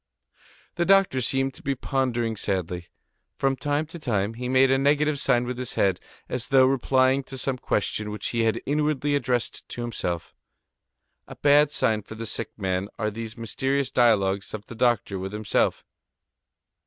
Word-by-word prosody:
The 175 - +2
doctor 195 -9 +4
seemed 135 +2 0
to - - -15
be 140 0 -1
pondering 120 -4 -1
sadly. 90 -4 -3 0.5
From 135 0 +1
time 145 +3 -1
to 165 +2 -10
time, 105 -6 -1
he 125 +2 -5
made 130 +1 +4
a 135 - +3
negative 145 +1 +2
sign 125 -3 +2
with 125 0 -4
his 125 - -3
head, 95 -2 +2 0.3
as 125 -1 -3
though 130 0 +6
replying 130 0 +3
to 135 - -8
some 130 0 -2
question 105 -1 -1
which 105 -1 -4
he 120 - -2
had 115 -1 0
inwardly 145 0 0
addressed 125 -4 -1
to 120 - -6
himself. 90 -8 -4 0.9
A - - -9
bad 145 0 +5
sign 110 -6 +1
for 110 - -10
the 115 +1 -6
sick - - -3
man 95 -1 -1
are 110 -2 -1
these 115 +1 -7
mysterious 135 +4 -1
dialogues 100 -4 +2
of 105 -1 -9
the - - -10
doctor 115 -4 +1
with 95 +2 -5
himself. 105 0 0
125 Hz, 170 wpm, -25 LUFS, 110-135 Hz, 0.9 s, though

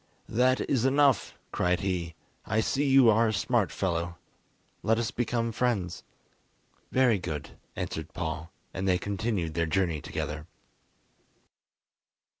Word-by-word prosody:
"That 130 +2 +2
is 125 -4 +1
enough," 140 0 +3
cried 90 -1 +1
he; 90 -4 -2 0.3
"I 110 - 0
see 140 +5 +1
you 135 -2 +7
are 115 +2 +4
a 110 - 0
smart 95 - +1
fellow, 85 -1 -2 0.6
let 110 0 +2
us 115 -1 -1
become 115 -1 -1
friends." 110 -7 -1 0.9
"Very 125 -5 +4
good," 80 -5 -5 0.2
answered 80 -1 -4
Paul, 80 -1 -4 0.2
and 95 +2 -2
they 90 -1 +4
continued 100 -3 -2
their 85 0 0
journey 85 -3 0
together. 75 +1 -4
95 Hz, 125 wpm, -28 LUFS, 85-120 Hz, 0.9 s, you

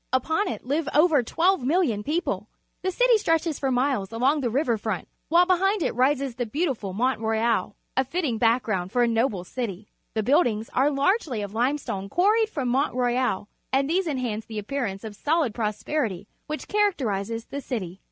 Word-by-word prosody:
L'pon 320 - +1
it - - -5
live 290 +4 0
over 305 -2 +5
1,2(X),000 315 - +1
people. 325 +7 -2 0.3
The 375 - 0
cit - - +2
y 460 - +7
stre 325 - +3
tches 320 -3 -4
for 270 - 0
miles 250 -6 0
along 265 +6 +2
the 245 - 0
river 250 0 +1
front, 215 -4 -3 0.2
while 345 +3 +5
behind 375 +1 +2
it - - 0
rises 265 +1 +1
the 245 0 -3
beautiful 260 - -2
Mount 250 +7 0
Royal 225 -2 0
— - - -48
a 265 - +3
fitting 275 -4 -2
BacTcground 225 -6 +1
for 245 +4 +2
a - - +3
noble 225 -5 0
city. 210 -1 -5 0.2
The 220 - +1
buildings 230 -4 +2
are 270 +3 +3
largely' 280 - +1
of 205 0 -6
limestone 235 -5 -1
(juarried 430 - +3
from 275 - -2
Mount 265 +1 +1
Royal, 245 -5 0 0.2
and 275 +1 +2
these 355 +3 +1
enhance 245 -7 -2
the 220 - -7
appearance 210 -3 -3
of 215 -2 -7
sohd 300 -1 +1
prosperity 210 - -2 0.2
which 305 +1 -5
characterizes 230 - 0
the 280 - -6
city. 195 -9 -5
255 Hz, 180 wpm, -25 LUFS, 220-305 Hz, 0.3 s, y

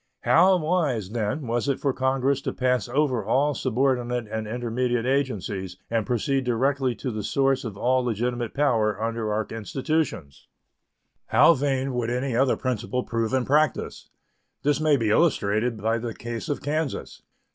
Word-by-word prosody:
How 185 +3 +5
wise, 155 - 0
then, 115 +5 -2
was 120 +3 -1
it 140 - 0
for 140 -2 0
Congress 130 +1 +1
to - - -3
pass 125 -1 0
over 130 -4 +1
all 135 +8 +2
subordinate 125 -2 0
and 110 -1 -3
intermediate 120 +1 -1
agencies 105 -9 -2
and 115 -3 0
proceed 135 +3 0
directly 130 +1 0
to 130 - -4
the 110 -1 -4
source 135 +5 +1
of 110 -5 -6
all 130 +3 +2
legitimate 120 0 -2
power 110 -8 +1
under 115 -1 -2
our 110 +1 0
institutions! 115 - -3 0.8
How 170 - +6
vain 135 -2 -1
would 120 -2 -1
any 125 0 -1
other 130 +2 +2
principle 125 0 -2
prove 115 -1 -2
in 130 -2 +1
practice! 150 -1 0 0.5
This 145 +1 +1
may 155 -2 +4
be 110 -4 0
illustrated 115 -5 +2
by 115 +2 0
the 115 -1 -5
case 115 -1 -6
of 145 - -3
Kansas. 150 0 -3
125 Hz, 155 wpm, -25 LUFS, 115-135 Hz, 0.8 s, How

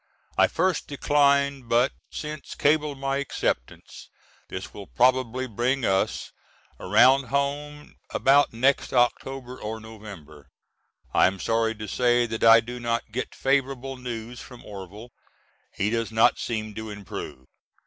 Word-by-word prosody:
I - - +5
first 185 -3 0
declined 140 -3 +2
but 120 +3 +3 0.2
since 150 -1 -7
cabled 150 -1 +1
my 135 0 -1
acceptance. 130 - -4 0.4
This - - -7
will - - -9
probably 130 - +2
bring 125 +2 -1
us 95 0 0 0.5
around 130 +7 +5
home 145 +3 -3
about 140 +2 +4
next 130 +4 +1
October 125 +1 0
or 110 +1 -5
November. 100 -11 -12 0.6
I - - +5
am 95 +1 -3
sorry 115 +1 0
to 110 0 -7
say 120 0 +2
that 110 -1 -4
I 115 0 +8
do 120 +2 -7
not 115 -2 -2
get 125 +4 -4
favorable 135 -1 0
news 120 -1 -7
from 125 -2 -13
Orvil. 105 +4 -10 0.6
He 105 +2 -1
does 115 -1 -1
not 110 +1 +4
seem 110 -2 -3
to 110 +1 -7
improve. 100 -10 -8
120 Hz, 135 wpm, -25 LUFS, 110-135 Hz, 0.6 s, I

